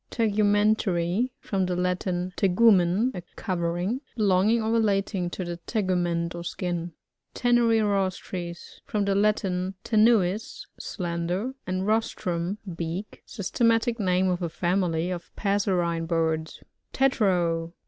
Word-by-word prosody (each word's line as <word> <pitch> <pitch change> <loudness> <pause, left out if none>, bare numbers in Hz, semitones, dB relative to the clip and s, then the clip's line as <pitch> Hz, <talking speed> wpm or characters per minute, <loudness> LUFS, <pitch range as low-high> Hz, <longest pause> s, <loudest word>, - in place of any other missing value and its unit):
TiouMKNTARY.— 205 -2 +2
From 190 -2 -1
the 180 - -1
Latin, 180 0 -1
teg* 190 -3 +1
umen^ 210 +2 +4
a 180 - -4 0.2
covering^. 180 +4 -1 0.2
Belonging 210 +1 +3
or 220 - 0
relating 200 -5 +1
to 180 +1 -5
the 175 0 -4
tegument 175 -5 0
or 170 0 -6
skin. 175 -1 -3 0.4
Tbnuirohtrrs. 200 -7 +1 0.2
— - - -53
From 205 -1 0
the 200 - +1
Latin, 195 -2 +1 0.2
leu 220 0 +6
tits, 215 +4 -7
slender, 175 +6 -3
and 185 0 -1
roslrum, 200 -4 -1 0.2
beak. 170 +5 -5
Systematic 230 +3 +1
name 185 -1 +2
of 180 0 0
a 170 - -1
family 175 0 0
of 175 -1 -6
passerine 180 -5 0
birds. 160 -1 -1 0.3
Tetrao. 175 -10 +1
185 Hz, 120 wpm, -26 LUFS, 175-215 Hz, 0.4 s, leu